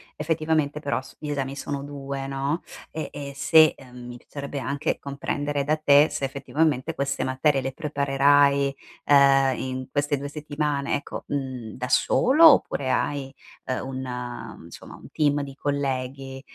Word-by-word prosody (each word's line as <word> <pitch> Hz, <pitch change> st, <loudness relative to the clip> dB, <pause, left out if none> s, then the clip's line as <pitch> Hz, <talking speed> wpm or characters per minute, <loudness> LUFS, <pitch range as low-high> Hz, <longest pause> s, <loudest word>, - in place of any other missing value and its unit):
effettivamente, 155 Hz, -2 st, 0 dB
però, 135 Hz, -4 st, -2 dB
s -, -, -16 dB
gli 150 Hz, -, -6 dB
esami 140 Hz, -1 st, -3 dB
sono 140 Hz, 0 st, -4 dB
2, 140 Hz, -1 st, -6 dB
no, 140 Hz, +4 st, -2 dB, 0.3 s
e 155 Hz, -, -5 dB
e 140 Hz, -1 st, -7 dB
se 155 Hz, +2 st, +5 dB
mhmm, 125 Hz, -2 st, -12 dB
mi 120 Hz, -, -8 dB
piacerebbe 140 Hz, +3 st, -7 dB
anche 140 Hz, +2 st, -2 dB
comprendere 140 Hz, 0 st, -3 dB
da 155 Hz, -, +2 dB
te 150 Hz, -1 st, +5 dB
se, 145 Hz, -1 st, -5 dB
effettivamente, 145 Hz, +2 st, -1 dB
queste 140 Hz, 0 st, -1 dB
materie 135 Hz, +2 st, +1 dB
le 135 Hz, 0 st, -4 dB
preparerai, 140 Hz, -1 st, +3 dB, 0.3 s
ehm, 135 Hz, -2 st, +5 dB
in 130 Hz, 0 st, -4 dB
queste 145 Hz, 0 st, 0 dB
2 140 Hz, +1 st, -5 dB
settimane, 145 Hz, -1 st, -2 dB
ecco, 145 Hz, -, -6 dB
mhmm, 130 Hz, -6 st, -4 dB
da 125 Hz, 0 st, -5 dB
solo, 305 Hz, +6 st, +5 dB
oppure 130 Hz, -, -1 dB
hai, 135 Hz, -2 st, -2 dB, 0.3 s
ehm, 130 Hz, 0 st, -3 dB
un, 125 Hz, -2 st, -6 dB
insomma, -, -, -11 dB
un -, -, -14 dB
team 145 Hz, -1 st, +1 dB
di 140 Hz, -, -8 dB
colleghi, 135 Hz, -1 st, -3 dB
140 Hz, 150 wpm, -25 LUFS, 135-145 Hz, 0.3 s, se